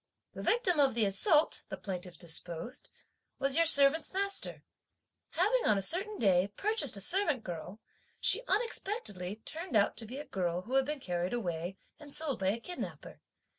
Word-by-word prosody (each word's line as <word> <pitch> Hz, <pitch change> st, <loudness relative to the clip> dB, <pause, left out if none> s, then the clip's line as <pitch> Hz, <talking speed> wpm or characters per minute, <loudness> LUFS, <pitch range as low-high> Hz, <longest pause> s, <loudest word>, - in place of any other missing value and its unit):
"The -, -, -9 dB
victim 395 Hz, -9 st, +1 dB
of 270 Hz, -4 st, +3 dB
the 225 Hz, -3 st, +3 dB
assault," 300 Hz, -, +4 dB
the -, -, -5 dB
plaintiffs 180 Hz, -3 st, -6 dB
deposed, 170 Hz, +6 st, -3 dB, 0.5 s
"was 275 Hz, 0 st, +2 dB
your 335 Hz, 0 st, +4 dB
servants' 285 Hz, +3 st, +6 dB
master. 395 Hz, 0 st, 0 dB, 0.7 s
Having 430 Hz, +8 st, +1 dB
on 210 Hz, -, +3 dB
a 195 Hz, -, -2 dB
certain 390 Hz, -, 0 dB
day, 190 Hz, -3 st, +2 dB
purchased 285 Hz, -, -1 dB
a -, -, -4 dB
servant 300 Hz, -, +1 dB
girl, 180 Hz, +4 st, -7 dB, 0.4 s
she -, -, +4 dB
unexpectedly 390 Hz, -, -1 dB
turned 315 Hz, +8 st, -7 dB
out 205 Hz, -1 st, +3 dB
to 225 Hz, -, -8 dB
be 255 Hz, +5 st, -7 dB
a 295 Hz, -, -7 dB
girl 180 Hz, -1 st, -3 dB
who 245 Hz, -, -8 dB
had 270 Hz, 0 st, +3 dB
been 300 Hz, +1 st, -4 dB
carried 175 Hz, -1 st, -3 dB
away 180 Hz, -4 st, -4 dB, 0.2 s
and 295 Hz, -2 st, -13 dB
sold 295 Hz, -4 st, -1 dB
by 190 Hz, -, -1 dB
a 210 Hz, +5 st, +1 dB
kidnapper. 355 Hz, +9 st, -7 dB
255 Hz, 170 wpm, -31 LUFS, -, 0.7 s, servants